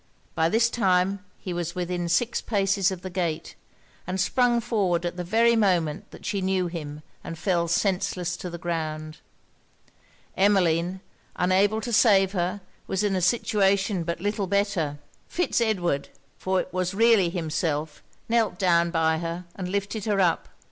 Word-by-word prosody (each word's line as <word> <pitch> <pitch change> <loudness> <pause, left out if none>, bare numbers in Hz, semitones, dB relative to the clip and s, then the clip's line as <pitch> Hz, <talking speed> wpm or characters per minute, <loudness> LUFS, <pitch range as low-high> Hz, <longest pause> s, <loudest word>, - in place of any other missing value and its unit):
By 160 0 +2
this 230 +5 +3
time 190 -2 +1
he 180 - -6
was 175 0 -3
within 175 -1 -2
six 230 +8 +1
paces 195 -2 +1
of 185 -2 -6
the 185 - -5
gate; 170 -3 -2 0.5
and 185 +1 -2
sprung 245 +4 +2
forward 195 -7 0
at 175 - -3
the 180 - -4
very 230 +6 +3
moment 175 -8 +1
that - - -13
she 200 - -1
knew 190 -1 +1
him, 155 -3 -6 0.2
and 165 - -6
fell 170 0 0
senseless 180 -1 -1
on 180 - -5
the 170 - -5
ground. 155 -2 -4 1.2
Emmeline, 185 -2 +2 0.3
unable 195 +4 +2
to 240 +1 -4
save 195 -4 +5
her, 185 +1 -2 0.3
was 190 +2 -1
in 200 -2 +1
a 185 - 0
situation 195 -1 +2
but 170 0 -3
little 205 +1 -1
better. 195 -7 0 0.3
Fitz 355 -8 0
Edward, 175 -11 0 0.3
for 190 0 0
it 185 - -5
was 185 +1 -1
really 225 -4 +4
himself, 160 -3 -2 0.3
knelt 225 -5 +1
down 170 -2 +3
by 160 -1 +1
her, 170 +1 -4
and 180 -2 -5
lifted 200 +2 -3
her 205 -2 +1
up. 175 -3 +2
185 Hz, 160 wpm, -25 LUFS, 170-200 Hz, 1.2 s, save